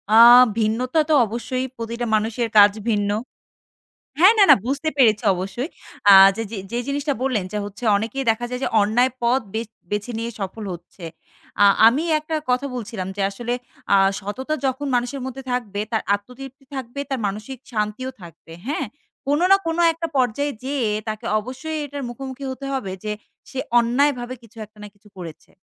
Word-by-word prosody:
আ - - +8 0.4
ভিন্নতা 240 +7 0
তো - - +4
অবশ্যই 250 +4 -3
প্রতিটা 235 +1 -4
মানুষের 225 +2 -1
কাজ 205 0 +8 0.2
ভিন্ন 205 -2 +1 1.1
হ্যাঁ, 375 +6 +8
না, 415 - +7
না - - +10
বুঝতে 280 +4 -1
পেরেছি 220 -5 +4
অবশ্যই। 195 - -4 0.7
যে, 225 - -3 0.3
জি 235 - -2
জিনিসটা 285 +1 -1
বললেন, 255 -7 0
যে, 210 - -3
হচ্ছে 205 +4 -10
অনেকেই 225 +6 -3
দেখা 240 +2 -4
যায় 250 0 -4
যে, - - +1
অন্যায় 235 +5 +2
পথ 245 +3 +2
বেচ 225 0 -3 0.2
বেছে 210 +3 -2
নিয়ে 230 +1 -3
সফল 195 +3 -5
হচ্ছে। 175 +1 -13 0.6
আ - - +8 0.2
আমি 265 +7 +2 0.2
একটা 315 +1 -4
কথা 250 +2 +1
বলছিলাম 215 -5 -5
যে, 205 - -3
আসলে 240 +4 -4 0.4
আ - - +7 0.2
সততা 255 +9 -4
যখন 265 +2 -1
মানুষের 245 +3 -2
মধ্যে 260 +1 -7
থাকবে, 210 -5 -2
তার 220 - 0
আত্মতৃপ্তি 265 +5 -11
থাকবে, 260 0 -6
তার 270 -2 -2
মানসিক 215 +7 -6
শান্তিও 215 +3 -2
থাকবে। 170 -1 -14 0.2
হ্যাঁ? 285 0 -1 0.4
কোন 290 +2 +2
না 390 - +8
কোন 325 0 -1 0.2
একটা 330 +1 -4
পর্যায়ে 260 +3 +1
যেয়ে 265 -5 -1 0.2
তাকে 215 +2 -6
অবশ্যই 260 +8 -6
এটার 285 0 -6
মুখোমুখি 265 +2 -8
হতে 270 +1 -7
হবে, 210 -8 -3
যে, 210 - -3 0.4
সে 265 - -5 0.2
অন্যায়ভাবে 250 +1 +1
কিছু 230 0 -19
একটা 215 +1 -29
না - - -7
কিছু 210 +1 -22
করেছে। 170 -4 -10
240 Hz, 170 wpm, -22 LUFS, 215-270 Hz, 1.1 s, না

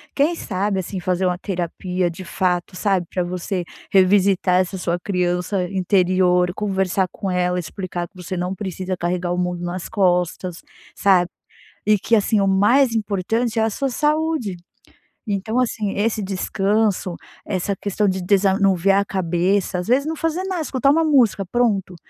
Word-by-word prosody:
quem 300 +5 +2
sabe, 195 - -2
assim, 190 +1 -4
fazer 180 +1 0
uma 180 -1 +1
terapia 180 0 -2
de 170 +3 -8
fato, 180 0 -1
sabe, 190 -3 0
pra 180 - 0
você 180 +1 -3 0.3
revisitar 190 -1 +4
essa 185 +1 -4
sua 175 -1 -1
criança 180 0 -1
interior, 180 -1 +2
conversar 190 -2 0
com 195 - -4
ela, 180 0 +1
explicar 175 0 -5
que 205 - -44
você 185 +1 -6
não 180 +1 -2
precisa 185 -1 -4
carregar 175 0 -2
o - - -2
mundo 180 -1 -2
nas 175 0 -4
costas, 180 -3 0 0.3
sabe. 185 -3 +3 0.6
E 210 0 +4
que, 230 - +2
assim, 215 0 +2
o 195 - +2
mais 230 +7 +4
importante 220 +3 -1
é - - +3
a 220 - +2
sua 275 +6 -1
saúde. 300 - 0 0.8
Então, 215 +5 -1
assim, 220 -5 -1
esse 215 +1 0
descanso, 195 0 0 0.3
essa 195 0 -2
questão 205 +2 -1
de 190 0 -2
desanuviar 195 0 +3
a - - -3
cabeça, 185 0 0
às 180 - -5
vezes, 260 +4 +3
não 320 - -2
fazer 325 +3 -1
nada, 375 -3 -2
escutar 275 -3 +1
uma 325 +3 +3
música, 245 -10 +3
pronto, 200 -3 0
190 Hz, 160 wpm, -21 LUFS, 180-210 Hz, 0.8 s, revisitar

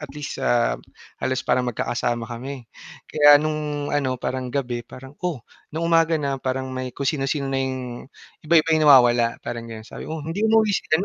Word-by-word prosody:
at 150 - -7
least, 150 -1 -6
ah, 120 -1 +1 0.4
halos 130 0 -1
parang 125 -1 +1
magkakasama 120 0 -2
kami. 125 +2 -7 0.4
Kaya 145 -1 +7
nung 150 -1 -2
ano, 135 -3 0
parang 130 0 -3
gabi 125 -3 -2
parang 130 +3 -12
oh, 165 -10 -3 0.2
nung 160 +2 -3
umaga 165 -1 +3
na, 140 -3 -2
parang 130 0 -3
may 130 0 -4
kung 140 - -3
sino-sino 135 -1 -1
na 135 - 0
yung 130 -2 -4 0.3
iba-iba 160 0 +3
yung 155 -1 +4
nawawala, 120 -3 +6
parang 120 -1 -5
ganon. 110 -1 -8
Sabi, - - -9
"Oh, 155 -1 -5
hindi 165 +6 -4
umuwi 220 -1 +3
si - - +1 0.2
ano." 185 - -2
135 Hz, 185 wpm, -23 LUFS, 125-155 Hz, 0.4 s, Kaya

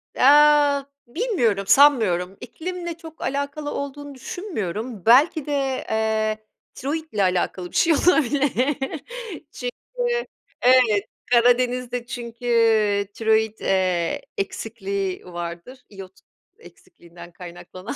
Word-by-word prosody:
Eee, 290 0 +5 0.2
bilmiyorum, 240 - 0
sanmıyorum, 210 -8 +4
iklimle 345 +6 -6
çok 320 -1 -13
alakalı 285 +1 -3
olduğunu 280 0 -6
düşünmüyorum. 230 - -5
Belki 275 +6 +5
de, 275 -3 -2
eee, 220 0 0 0.4
tiroit 315 +4 -5
ile 205 -2 +1
alakalı 180 -1 -1
bir - - -14
şey 330 - +4
olabilir 290 -4 +2 1.0
çünkü, 480 - -3 0.4
evet, 245 -5 +4 0.3
Karadeniz'de 245 0 +2
çünkü, 240 -1 -8
iii, 220 -4 +3
tiroit, 220 0 +1
eee, 185 -3 0 0.2
eksikliği 195 -2 -4
vardır, 175 +8 -7
iyot 195 -2 -11 0.5
eksikliğinden 175 - -15
kaynaklanan, 180 +4 -9
240 Hz, 95 wpm, -23 LUFS, 200-285 Hz, 1.0 s, Eee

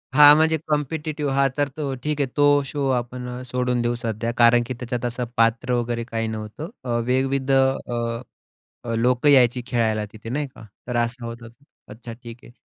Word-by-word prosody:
हा 145 0 +10
म्हणजे 160 +1 +3
कॉम्पिटिटिव्ह 150 0 -2
हा 140 0 +3
तर 145 -1 +2
तो 140 -3 -2
ठीक 150 -1 -2
आहे, 135 - +1
तो 145 0 +5
शो 140 0 -2
आपण 125 0 -3 0.2
सोडून 125 -1 0
देऊ 120 0 0
सध्या, 115 0 -3
कारण 120 0 +6
की 130 - -3
त्याच्यात 125 0 -4
असं 120 +1 -2
पात्र 115 +2 +2
वगैरे 120 -1 -1
काही 115 -1 -3
नव्हतं 110 +8 -6
अ, 125 - -6 0.2
विविध 130 +1 0
अ, 120 -3 0 0.6
अ, 115 - -3
लोकं 125 +4 +2
यायची 125 -3 +5
खेळायला 110 -4 0
तिथे. 110 +1 -10
नाही 145 +2 -1
का? - - -13 0.2
तर 125 - -2
असा 120 +1 -1
होता 115 0 -8
ते. 120 +5 -24 0.2
अच्छा. 115 +2 -9
ठीक 115 0 -11
आहे. 120 - -15
125 Hz, 185 wpm, -23 LUFS, 115-140 Hz, 0.6 s, हा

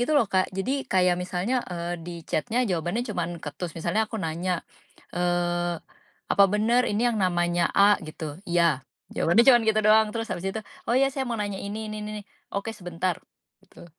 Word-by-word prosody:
gitu 245 +5 +1
loh, 280 - +5
Kak. 190 -1 +2
Jadi, 265 +8 -1
kayak 180 -1 +3
misalnya, 185 +8 -1
eee, 175 -1 -3
di 175 +1 -7
chat-nya 235 - 0
jawabannya 175 +5 -1
cuman 175 -7 -3
ketus, 160 +3 -6
misalnya 175 +7 0
aku 225 - -5
nanya, 175 -1 -2 0.5
eee, 175 -1 0 0.6
"Apa 200 - +6
bener 225 +5 +2
ini 210 +3 0
yang 225 -3 -1
namanya 175 -2 +2
A?" 200 +1 +5
Gitu, 155 +1 -7
"Iya." 170 -5 +3 0.3
Jawabannya 200 +8 +4
cuman 240 -3 +7
gitu 215 0 +4
doang, 215 0 +6
terus 225 0 -3
habis 185 +2 -3
itu, 220 +3 -3 0.3
"Oh, 240 - +3
iya, 270 +1 +4
saya 265 0 -2
mau 235 - -2
nanya 205 -2 -3
ini-ini, 215 +1 -5
n-ni-ni." 210 0 -5 0.3
"Oke, 210 +3 -2
sebentar." 180 -3 -3 0.4
Gitu. 185 - -15
190 Hz, 175 wpm, -26 LUFS, 175-220 Hz, 0.6 s, cuman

